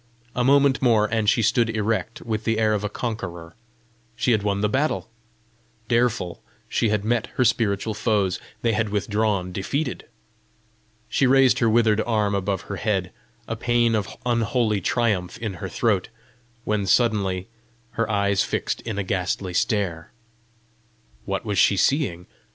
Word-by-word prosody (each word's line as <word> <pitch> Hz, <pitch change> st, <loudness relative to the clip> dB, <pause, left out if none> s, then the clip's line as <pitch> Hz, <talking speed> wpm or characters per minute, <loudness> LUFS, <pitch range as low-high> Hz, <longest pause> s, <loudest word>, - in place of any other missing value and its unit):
A 125 Hz, -, +1 dB
moment 140 Hz, +1 st, +4 dB
more, 115 Hz, -5 st, +4 dB
and 110 Hz, -1 st, +1 dB
she 115 Hz, -1 st, +2 dB
stood 115 Hz, +1 st, +2 dB
erect, 110 Hz, +1 st, -2 dB
with 110 Hz, -1 st, -3 dB
the 115 Hz, 0 st, 0 dB
air 110 Hz, -1 st, +2 dB
of 105 Hz, -1 st, -1 dB
a 105 Hz, -, -1 dB
conqueror: 90 Hz, -8 st, -5 dB, 0.6 s
she 115 Hz, +2 st, +1 dB
had 110 Hz, -3 st, +3 dB
won 100 Hz, -1 st, -1 dB
the 105 Hz, -, +2 dB
battle! 130 Hz, -1 st, -1 dB, 0.8 s
Dareful 115 Hz, -7 st, 0 dB, 0.3 s
she 115 Hz, -, +1 dB
had 105 Hz, -1 st, 0 dB
met 115 Hz, 0 st, 0 dB
her 125 Hz, -, +3 dB
spiritual 110 Hz, -2 st, +1 dB
foes; 100 Hz, -4 st, 0 dB, 0.2 s
they 115 Hz, -1 st, +2 dB
had 110 Hz, 0 st, 0 dB
withdrawn 105 Hz, -2 st, 0 dB
defeated! 130 Hz, +10 st, -3 dB, 1.0 s
She 135 Hz, -, +2 dB
raised 135 Hz, 0 st, +5 dB
her 115 Hz, -, +3 dB
withered 110 Hz, -1 st, +3 dB
arm 110 Hz, -3 st, 0 dB
above 100 Hz, -1 st, -1 dB
her 100 Hz, -, -6 dB
head, 95 Hz, -2 st, -1 dB, 0.4 s
a 115 Hz, -, -3 dB
pæan 120 Hz, 0 st, +2 dB
of 105 Hz, -3 st, -2 dB
unholy 115 Hz, -3 st, +1 dB
triumph 105 Hz, -3 st, 0 dB
in 110 Hz, -3 st, -4 dB
her 95 Hz, -, -4 dB
throat 105 Hz, -5 st, 0 dB, 0.5 s
when 105 Hz, -3 st, -1 dB
suddenly 95 Hz, -4 st, +1 dB, 0.4 s
her 115 Hz, -1 st, -2 dB
eyes 100 Hz, -1 st, +2 dB
fixed -, -, -2 dB
in 115 Hz, -4 st, -5 dB
a 100 Hz, -, 0 dB
ghastly 90 Hz, 0 st, -2 dB
stare. 100 Hz, -6 st, -1 dB, 1.1 s
What 100 Hz, +1 st, -3 dB
was 105 Hz, -2 st, 0 dB
she 100 Hz, -, +4 dB
seeing? 95 Hz, -, +1 dB
110 Hz, 155 wpm, -23 LUFS, 100-115 Hz, 1.1 s, raised